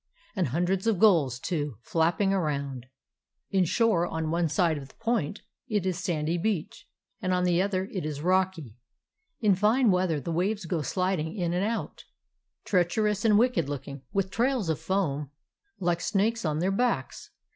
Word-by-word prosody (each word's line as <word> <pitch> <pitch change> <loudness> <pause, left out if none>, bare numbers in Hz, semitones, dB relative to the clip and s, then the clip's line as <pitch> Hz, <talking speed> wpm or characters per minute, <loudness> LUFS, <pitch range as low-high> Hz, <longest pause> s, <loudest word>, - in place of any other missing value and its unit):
And 185 -6 +1
hundreds 180 - 0
of 220 -4 +3
gulls, 165 - +4
too, 145 - -3
flapping 175 +4 +1
around. 140 -8 -2 0.6
In 190 -2 +3
shore 185 -2 +2
on 160 -2 -3
one 170 -1 +1
side 165 -2 +1
of 135 - -10
the - - -21
point 225 -7 -2 0.2
it 210 -6 0
is 185 -1 -1
sandy 165 0 -1
beach, 190 -4 -2 0.3
and 185 0 +1
on 180 - +1
the 180 0 +3
other 190 -1 0
it 185 - -3
is 150 -2 -4
rocky. 180 - 0 0.6
In 210 -3 +4
fine 215 +5 +3
wea 185 0 +2
ther 160 -3 0
the 165 - -5
waves 190 +4 -1
go 165 -1 -1
sliding 180 0 -1
in 175 -4 -1
and 180 +2 0
out, 225 +2 -3 0.6
treach 180 -1 +1
erous 210 -2 +1
and 215 -2 +5
wicked 220 - +2
looking, 140 -1 -6
with 195 -1 -1
trails 240 -5 0
of 155 -1 0
foam 160 -5 -1 0.5
like 175 -1 0
snakes 215 +1 0
on 150 -1 0
their 180 +4 +1
backs. 240 +4 -1
180 Hz, 175 wpm, -27 LUFS, 160-200 Hz, 0.6 s, and